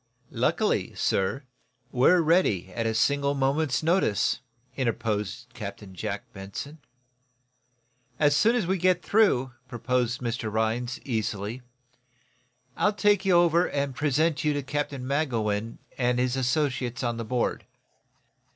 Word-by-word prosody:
"Luckily, -, -, 0 dB
sir, 100 Hz, +9 st, 0 dB, 0.5 s
we're 155 Hz, +8 st, +5 dB
ready, 155 Hz, -, +2 dB
at 115 Hz, +2 st, -1 dB
a 110 Hz, -, -1 dB
single 140 Hz, +4 st, +2 dB
moment's 140 Hz, +1 st, +1 dB
notice," 165 Hz, -, +2 dB, 0.4 s
interposed 115 Hz, -2 st, -2 dB
Captain 100 Hz, -4 st, -8 dB
Jack 90 Hz, -, -4 dB
Benson. 120 Hz, +11 st, -8 dB, 1.4 s
"As 145 Hz, 0 st, +3 dB
soon 225 Hz, +10 st, +4 dB
as 230 Hz, -7 st, +1 dB
we 190 Hz, +1 st, 0 dB
get 180 Hz, 0 st, +2 dB
through," 190 Hz, -, +3 dB, 0.2 s
proposed 120 Hz, 0 st, -1 dB
Mr. 115 Hz, -2 st, -3 dB
Rhinds, 115 Hz, +4 st, -1 dB
easily, 110 Hz, -1 st, -3 dB, 1.1 s
"I'll 210 Hz, -, +2 dB
take 205 Hz, -1 st, +2 dB
you 190 Hz, -, +4 dB
over 175 Hz, 0 st, +4 dB
and 140 Hz, -1 st, -1 dB
present 150 Hz, +2 st, +1 dB
you 150 Hz, -1 st, +2 dB
to 145 Hz, -1 st, -2 dB
Captain 140 Hz, -1 st, -3 dB
Magowan 115 Hz, -6 st, -1 dB, 0.2 s
and 125 Hz, -1 st, +2 dB
his 125 Hz, 0 st, +1 dB
associates 130 Hz, -2 st, -1 dB
on 120 Hz, -1 st, -1 dB
the 115 Hz, -, -3 dB
board." 120 Hz, +1 st, -2 dB
130 Hz, 125 wpm, -26 LUFS, 115-155 Hz, 1.4 s, we're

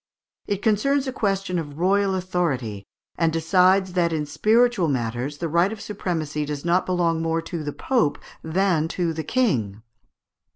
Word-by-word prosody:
It 200 Hz, -1 st, -2 dB
concerns 265 Hz, +6 st, +2 dB
a 260 Hz, -, -3 dB
question 195 Hz, -6 st, -1 dB
of 145 Hz, -3 st, -7 dB
royal 195 Hz, +2 st, +2 dB
authority, 145 Hz, -, -2 dB, 0.3 s
and 165 Hz, -1 st, +3 dB
decides 185 Hz, +3 st, +3 dB
that 175 Hz, -2 st, +2 dB
in 155 Hz, -2 st, -1 dB
spiritual 215 Hz, +5 st, +2 dB
matters 125 Hz, +1 st, -2 dB
the 170 Hz, -, -3 dB
right 170 Hz, +5 st, +2 dB
of 220 Hz, -, -6 dB
supremacy 165 Hz, -7 st, -3 dB
does 145 Hz, +1 st, -5 dB
not 175 Hz, +2 st, +2 dB
belong 170 Hz, -3 st, +1 dB
more 165 Hz, 0 st, 0 dB
to 165 Hz, -1 st, -5 dB
the 145 Hz, -, -3 dB
Pope 230 Hz, -, 0 dB, 0.3 s
than 165 Hz, -1 st, +1 dB
to 170 Hz, 0 st, -1 dB
the 160 Hz, 0 st, -4 dB
King. 115 Hz, -, 0 dB
170 Hz, 160 wpm, -23 LUFS, 150-195 Hz, 0.3 s, and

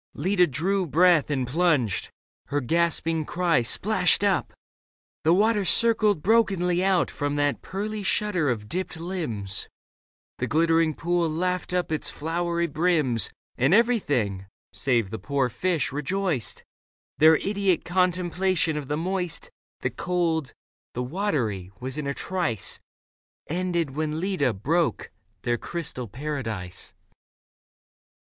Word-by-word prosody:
Leda 180 Hz, +3 st, +3 dB
drew 180 Hz, +7 st, 0 dB
breath 170 Hz, 0 st, +4 dB
and 135 Hz, -3 st, 0 dB
plunged; 140 Hz, -, +1 dB, 0.4 s
her 145 Hz, -, 0 dB
gasping 165 Hz, +3 st, +1 dB
cry 170 Hz, -4 st, +1 dB
Splashed 115 Hz, -, +3 dB
up; -, -, +1 dB, 0.7 s
the 160 Hz, -, +4 dB
water 210 Hz, +3 st, +3 dB
circled 215 Hz, -2 st, +3 dB
brokenly 185 Hz, -5 st, +2 dB
Out 190 Hz, -2 st, +2 dB
from 145 Hz, 0 st, -2 dB
that 145 Hz, -1 st, 0 dB
pearly 210 Hz, +2 st, -4 dB
shudder 195 Hz, -6 st, +1 dB
of 110 Hz, -4 st, -2 dB
dipped 175 Hz, +3 st, -3 dB
limbs; 150 Hz, -, -4 dB, 0.7 s
The 125 Hz, -, -1 dB
glittering 165 Hz, +2 st, +2 dB
pool 175 Hz, -1 st, 0 dB
laughed 180 Hz, +4 st, -1 dB
up 180 Hz, -2 st, -1 dB
its 155 Hz, -, 0 dB
flowery 170 Hz, +2 st, -1 dB
brims, 155 Hz, -7 st, +1 dB, 0.3 s
And 135 Hz, +9 st, +4 dB
everything, 140 Hz, -, +1 dB, 0.3 s
save 120 Hz, -7 st, 0 dB
the 110 Hz, -, -4 dB
poor 140 Hz, -3 st, 0 dB
fish, 175 Hz, +4 st, -1 dB
rejoiced: 155 Hz, -, -2 dB, 0.6 s
Their 160 Hz, +1 st, +7 dB
idiot 195 Hz, 0 st, 0 dB
contemplation 180 Hz, -2 st, +1 dB
of 145 Hz, -3 st, -5 dB
the 150 Hz, +1 st, -1 dB
Moist, 180 Hz, 0 st, -1 dB, 0.3 s
The -, -, -1 dB
Cold, 170 Hz, -5 st, -1 dB, 0.4 s
the 125 Hz, -, -1 dB
Watery, 125 Hz, -, -2 dB
was 130 Hz, +3 st, -4 dB
in 145 Hz, -, -3 dB
a 140 Hz, -, -1 dB
trice 175 Hz, -, -2 dB, 0.7 s
Ended 170 Hz, -2 st, -1 dB
when 155 Hz, 0 st, -2 dB
Leda 175 Hz, -8 st, +1 dB
broke 160 Hz, -, 0 dB, 0.3 s
their 120 Hz, -1 st, 0 dB
crystal 155 Hz, -8 st, -5 dB
paradise. 115 Hz, -8 st, -5 dB
165 Hz, 125 wpm, -25 LUFS, 140-180 Hz, 0.7 s, Their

